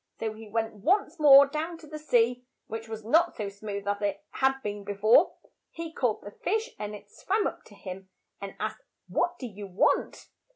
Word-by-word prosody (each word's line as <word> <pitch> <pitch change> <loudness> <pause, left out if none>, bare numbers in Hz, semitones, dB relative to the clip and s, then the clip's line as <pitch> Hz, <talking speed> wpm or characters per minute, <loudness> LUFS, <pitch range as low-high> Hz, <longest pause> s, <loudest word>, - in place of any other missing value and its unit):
So 220 -1 -2
he 220 0 -11
went 225 +1 -1
once 360 - +1
more 280 -2 +9
down 315 +4 -4
to 325 - -14
the 305 0 -8
sea, 245 -4 +2 0.2
which 225 +1 -7
was 220 -1 -6
not 330 +9 +3
so 210 -2 -3
smooth 200 0 -6
as 205 0 -1
it 200 -1 -2
had 270 0 +1
been 205 -1 -4
be 205 0 -4
fore. 220 - +5 0.3
He 330 -1 -7
called 245 -8 0
the 205 - -8
fish, 440 - -2
and 210 0 -4
it 205 0 -14
swam 410 +2 0
up - - -3
to - - -16
him 190 0 -9 0.3
and 200 -1 -6
asked, 215 0 -3 0.3
"What 345 - 0
do 265 - -6
you 205 -3 -8
want?' 185 +1 +1
225 Hz, 205 wpm, -28 LUFS, 205-305 Hz, 0.3 s, more